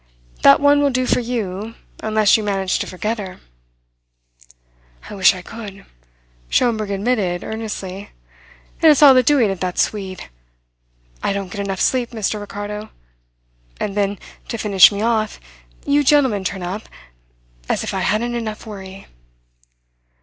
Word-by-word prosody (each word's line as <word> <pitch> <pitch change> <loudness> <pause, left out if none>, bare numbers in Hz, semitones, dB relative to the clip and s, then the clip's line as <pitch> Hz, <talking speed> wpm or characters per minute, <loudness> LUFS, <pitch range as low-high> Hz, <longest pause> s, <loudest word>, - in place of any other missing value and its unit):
That - - +7
one 285 0 +4
will 285 - +3
do 255 -1 0
for - - +2
you, 225 -3 -4 0.2
unless 215 -1 +3
you 220 - +1
manage 195 -2 -1
to - - -3
forget 215 +5 -3
her." 190 -3 -7 1.7
"I - - -6
wish 190 -1 +4
I 180 - -9
could," 205 -3 -10 0.6
Schomberg 220 -4 +1
admitted 200 -3 -1
earnestly. 205 -3 -6 0.7
"And 320 -2 +7
it's 295 0 +4
all 280 -2 +10
the 255 - +5
doing 250 -5 +3
of 190 - -5
that 180 -1 -3
Swede. 190 -3 -2 0.9
I - - 0
don't 195 -2 -4
get 205 - -4
enough 195 -1 -4
sleep, 250 -2 0
Mr. 215 -1 -2
Ricardo. 205 +1 -6 0.9
And 200 -1 -3
then, 200 0 0 0.3
to 230 - -4
finish 200 -3 +6
me 205 +1 -3
off, 220 -2 0 0.5
you 290 +1 +3
gentlemen 265 -8 +3
turn 190 0 -4
up... 190 +5 -5 0.8
as - - 0
if - - -4
I - - -1
hadn't 235 +3 0
enough 225 -2 -5
worry." 195 -2 -9
210 Hz, 150 wpm, -20 LUFS, 195-235 Hz, 1.7 s, all